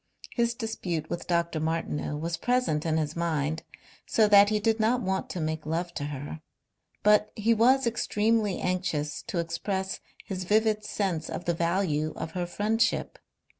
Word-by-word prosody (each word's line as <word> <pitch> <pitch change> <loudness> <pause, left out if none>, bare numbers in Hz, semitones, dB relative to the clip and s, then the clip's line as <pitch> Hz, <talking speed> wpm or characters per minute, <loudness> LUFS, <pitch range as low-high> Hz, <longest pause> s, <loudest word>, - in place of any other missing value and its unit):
His 235 -1 +1
dispute 185 -9 -3
with 175 - -4
Dr. 170 -2 +1
Martineau 155 -2 -2
was 165 +2 -2
present 170 -9 0
in 160 0 +2
his 155 -1 -1
mind, 160 -2 -1 0.5
so 220 -2 +4
that 205 0 +8
he 215 0 +1
did 225 +2 +1
not 230 +3 +3
want 190 0 -1
to 180 - -4
make 160 -1 -2
love 170 +3 -2
to 145 - -3
her. 145 +2 -6 0.6
But 210 0 +4
he 220 +2 +3
was 255 +4 +4
extremely 220 -2 +1
anxious 160 -5 -1
to 220 -6 -3
express 190 +3 -2 0.3
his 185 -2 -4
vivid 215 +2 +2
sense 180 -8 -2
of - - -5
the 170 - +1
value 165 -3 0
of 160 - -5
her 175 0 -2
friendship. 220 +5 0
180 Hz, 165 wpm, -28 LUFS, 160-215 Hz, 0.6 s, that